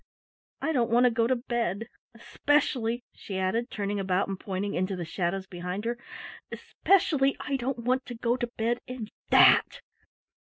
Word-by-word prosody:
I 320 - +1
don't 245 -6 +1
want 240 +2 +4
to 250 - +5
go 230 0 +2
to 260 - +2
bed. 230 -4 -2 0.3
Especially" 240 -1 0
she 195 - -6
added, 225 +6 0
turning 205 -1 -2
about 190 -1 0
and 195 -1 -4
pointing 200 +1 -3
into 185 +2 -1
the 175 -2 -4
shadows 185 +3 -2
behind 180 +3 -5
her 235 +1 0 0.6
"especially 295 -8 +2
I 285 - -2
don't 260 0 -2
want 255 +3 -1
to 245 - -6
go 235 +1 0
to 240 -1 -2
bed 235 +2 0
in 250 -4 -6 0.2
that!" - - +6
230 Hz, 165 wpm, -28 LUFS, 195-250 Hz, 0.6 s, that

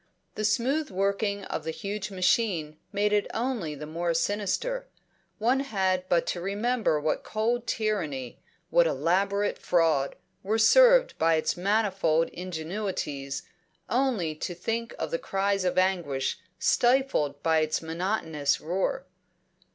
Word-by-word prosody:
The 215 - -4
smooth 260 +8 +1
working 200 +1 -1
of - - -4
the - - -4
huge 200 +4 -4
machine 185 -5 0
made 210 0 +1
it 205 -1 +2
only 225 - -2
the 150 +1 -7
more 170 +2 -2
sinister; 210 - -1 0.5
one 245 +5 +2
had 190 -8 0
but 170 -1 +3
to 175 - -3
remember 205 -2 0
what 155 +1 -1
cold 230 +2 -1
tyranny, 160 - -2 0.3
what 170 -1 +5
elaborate 195 +8 +1
fraud, 160 -6 +2 0.3
were 210 +3 0
served - - +6
by 165 0 +4
its 155 - 0
manifold 190 -4 +1
ingenuities, 165 -5 -4 0.5
only 235 -10 +1
to 170 +3 -5
think 230 +6 -3
of - - -4
the 165 - -1
cries 195 0 0
of 180 - 0
anguish 175 -7 0 0.2
stifled 240 - +2
by 160 -1 +3
its 155 +1 0
monotonous 160 -3 -1
roar. 190 - -2
190 Hz, 130 wpm, -27 LUFS, 160-220 Hz, 0.5 s, served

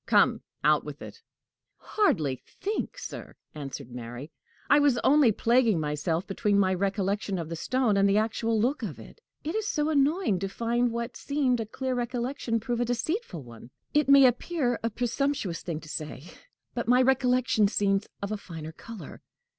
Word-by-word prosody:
Come, - - +4 0.2
out - - +4
with - - -8
it!" - - -11 0.6
"Hardly 155 - 0
think, 425 +4 -4
sir," - - -8 0.2
answered 135 -4 -7
Mary. 120 +4 -7 0.4
"I 290 - +6
was 285 -4 +4
only 280 -4 +5
plaguing 230 -3 +3
myself 155 +4 -1
between 200 +1 0
my 190 -1 +3
recollection 195 +1 -1
of 165 -2 -4
the 165 - -3
stone 245 +5 +1
and 200 0 +4
the 200 - +3
actual 225 +1 +1
look 255 +7 +1
of 200 -10 -5
it. 460 - -13 0.2
It 315 - -3
is 435 -1 -1
so 300 -4 0
annoying 295 - +2
to 195 +1 -3
find 235 +4 0
what 235 +1 -4
seemed 275 -4 0
a 225 - -3
clear 260 +3 -3
recollection 245 -1 -2
prove 235 +2 -2
a 245 - +1
deceitful 245 - -2
one! 120 -1 -13 0.2
It 295 -2 +2
may 275 -1 +8
appear 250 0 +1
a 230 - 0
presumptuous 245 - -1
thing 165 -3 -4
to 155 - -12
say, 150 -3 -5 0.5
but 235 -2 -3
my 250 +2 +5
recollection 250 -4 +3
seems 195 -1 +1 0.2
of 200 - -3
a 215 - -1
finer 160 -5 -8
color." 230 +6 -10
230 Hz, 175 wpm, -28 LUFS, 190-260 Hz, 0.6 s, may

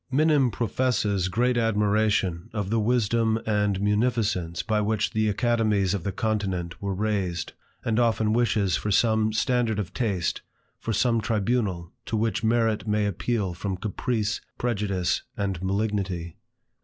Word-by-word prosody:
Minim 145 -1 +3
professes 105 -4 0
great 120 +7 +1
admiration 105 -5 +1
of 105 -3 -3
the 115 - +2
wisdom 115 0 +2
and 105 -2 +1
munificence 105 -5 0
by 110 -1 +1
which 105 0 0
the 110 -2 +1
academies 105 -3 +1
of 100 -4 -2
the 100 - -2
continent 95 -4 -2
were 100 -1 -2
raised; 95 -4 -2 0.3
and 115 0 +1
often 110 -2 +2
wishes 105 -6 +2
for 105 - -2
some 110 +1 +3
standard 115 -1 +1
of 105 -5 -4
taste, 100 -9 -1 0.4
for 115 - -3
some 115 +1 +2
tribunal, 105 -5 -1 0.2
to 110 - -1
which 115 +1 0
merit 115 -1 +1
may 105 0 +1
appeal 100 -1 -1
from 95 +2 -3
caprice, 110 +2 -2 0.2
prejudice, 100 -7 0 0.2
and 95 -4 -2
malignity. 95 -4 -2
105 Hz, 140 wpm, -26 LUFS, 95-115 Hz, 0.4 s, Minim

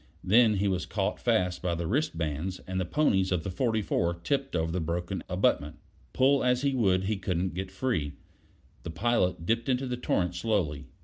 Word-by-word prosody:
Then 110 +2 +5
he 100 +1 +1
was 95 -3 -1
caught - - -1
fast 90 -1 +1
by 90 -2 -1
the 85 0 -3
wristbands, 90 - -1
and 95 0 -3
the - - -1
ponies 95 - +2
of 90 -4 0
the 95 - -4
44 105 -5 0
tipped 135 -3 -1
over 80 -1 0
the 90 - -1
broken 85 +3 -3
abutment. 75 -4 +1 0.4
Pull 135 +2 +3
as 125 +1 +2
he 140 -1 +2
would 95 -7 +2
he 105 +2 -1
couldn't 90 -1 -2
get 95 +2 -4
free. 95 - -2 0.7
The - - -7
pilot 90 -1 0
dipped 115 +5 0
into 130 +1 +1
the 125 -1 -3
torrent 90 -7 0
slowly. 85 - -1
95 Hz, 185 wpm, -28 LUFS, 85-120 Hz, 0.7 s, Then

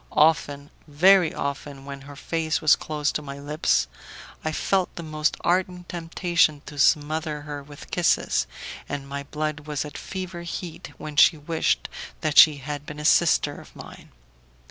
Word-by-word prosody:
Often, 145 -2 +2 0.2
very 175 +3 +5
often, 140 -1 -5
when 140 -1 -8
her 145 +1 -11
face 160 +1 -1
was 155 -1 +5
close 150 -2 -2
to - - -3
my 140 -1 -8
lips, 140 - +1 0.6
I 155 - -1
felt 185 +3 0
the 170 - -6
most 155 0 -1
ardent 180 0 0
temptation 165 -3 +1
to 145 -1 -9
smother 150 +1 +2
her 145 -1 -6
with 145 +1 -13
kisses, 165 - +1 0.4
and 140 -1 -4
my 140 0 -4
blood 150 +1 -4
was 150 -1 -2
at 150 - -8
fever 185 -2 -6
heat 170 0 -7
when 150 -1 -8
she 160 - +7
wished 160 +2 0 0.3
that 155 -1 +4
she 155 -2 +8
had 145 +1 -6
been 150 0 -9
a 150 - -5
sister - - +3
of - - -17
mine. - - -12
150 Hz, 165 wpm, -25 LUFS, 145-165 Hz, 0.6 s, she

